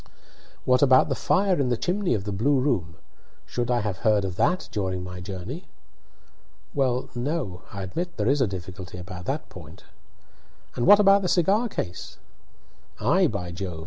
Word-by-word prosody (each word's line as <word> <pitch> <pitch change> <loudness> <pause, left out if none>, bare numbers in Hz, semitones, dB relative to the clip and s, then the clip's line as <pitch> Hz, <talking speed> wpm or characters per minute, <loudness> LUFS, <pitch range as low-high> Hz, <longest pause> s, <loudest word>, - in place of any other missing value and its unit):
"What 125 0 +4
about 130 -2 +5
the - - +1
fire 190 -2 +1
in 130 - +1
the 120 - +1
chimney 180 - 0
of 100 - -3
the 105 - -4
blue 130 +8 +2
room 95 - 0 0.5
should 120 -1 -3
I 120 -1 +2
have 105 -4 -3
heard 105 +1 +2
of 95 -2 -4
that 180 - +1
during 95 -3 -2
my 90 0 -7
journey?" 100 - -7 1.1
"Well, 130 -3 0
no; 120 - -3
I 100 -1 -5
admit 170 - -4
there 105 -1 0
is 140 +2 +3
a 130 - +3
difficulty 95 -1 -7
about 90 0 -8
that 145 +7 -3
point." 80 -3 -12 0.9
"And 120 - 0
what 205 - +9
about 200 -1 +6
the 185 - -1
cigar 195 +7 +2
case?" 90 - -5 0.8
"Ay, 175 - +3
by 90 -7 -4
Jove! 90 -2 -5
120 Hz, 175 wpm, -25 LUFS, 95-150 Hz, 1.1 s, what